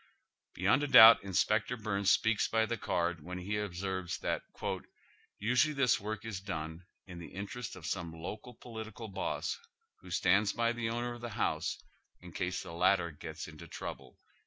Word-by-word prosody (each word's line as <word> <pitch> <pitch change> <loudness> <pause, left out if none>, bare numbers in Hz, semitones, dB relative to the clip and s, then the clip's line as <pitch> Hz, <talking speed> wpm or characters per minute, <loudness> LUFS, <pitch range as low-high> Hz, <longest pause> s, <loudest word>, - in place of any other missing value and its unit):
Beyond 100 +10 +3
a 145 - 0
doubt 115 -5 +10
Inspector 105 +5 +1
Byrnes 100 -3 0
speaks 115 -2 +3
by 110 0 +2
the 115 - -2
card 85 -6 -1
when 90 +3 -6
he 100 +3 -2
observes 95 -2 -3
that - - -1 0.5
" - - -33 0.3
usually 125 +8 +2
this 135 -3 +3
work 110 +1 -5
is 110 -5 -4
done 85 -2 -6 0.2
in 90 -3 -9
the 85 - -8
interest 100 +4 -6
of 90 -4 -10
some 85 -3 -3
local 105 +9 -7
political 110 -1 -8
boss, 100 - -2 0.4
who - - -13
stands 100 +3 +3
by 115 0 +1
the 120 -1 -2
owner 120 +1 -2
of 120 - -10
the 120 - -4
house, 80 +1 0 0.4
in 90 0 -12
case 90 +2 -2
the - - -9
latter 90 0 +3
gets 75 - -7
into - - -11
trouble." - - -7
100 Hz, 175 wpm, -32 LUFS, 90-115 Hz, 0.5 s, doubt